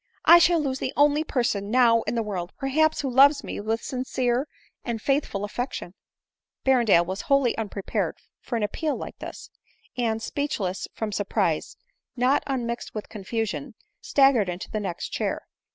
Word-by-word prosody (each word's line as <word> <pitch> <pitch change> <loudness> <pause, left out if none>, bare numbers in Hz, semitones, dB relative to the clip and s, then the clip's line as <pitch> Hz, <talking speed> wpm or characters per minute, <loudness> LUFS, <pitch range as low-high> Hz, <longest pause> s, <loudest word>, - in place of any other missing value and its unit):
I 345 - +9
shall 345 0 +4
lose 270 -3 -2
the 260 - -3
only 295 +1 +4
person 235 -9 -1
now 230 -1 +5
in - - -1
the 230 - 0
world, 185 -5 -4
perhaps, 310 +4 +1
who 275 - -2
loves 280 +3 +6
me - - -5
with 220 +2 -2
sincere 255 0 -1 0.4
and 235 -2 -3
faithful 270 -6 0
affection 230 -4 -5 0.4
!" - - -58
Berrendale 235 -10 +4
was 190 +3 -4
wholly 275 -4 +3
unprepared 205 -3 -3 0.2
for 240 - -5
an 225 - 0
appeal 300 +9 -1
like - - -8
this; - - -9 0.4
and, 225 -3 0
speechless 220 -8 -3
from 220 -2 -3
surprise 205 -1 -1 0.4
not 255 +3 +3
unmixed 240 -4 -3
with 215 - -5
confusion, 210 -5 -4 0.3
staggered 270 -8 +4
into 180 +1 -6
the 215 - -1
next 190 -4 -4
chair. - - -2
240 Hz, 160 wpm, -25 LUFS, 210-275 Hz, 0.4 s, I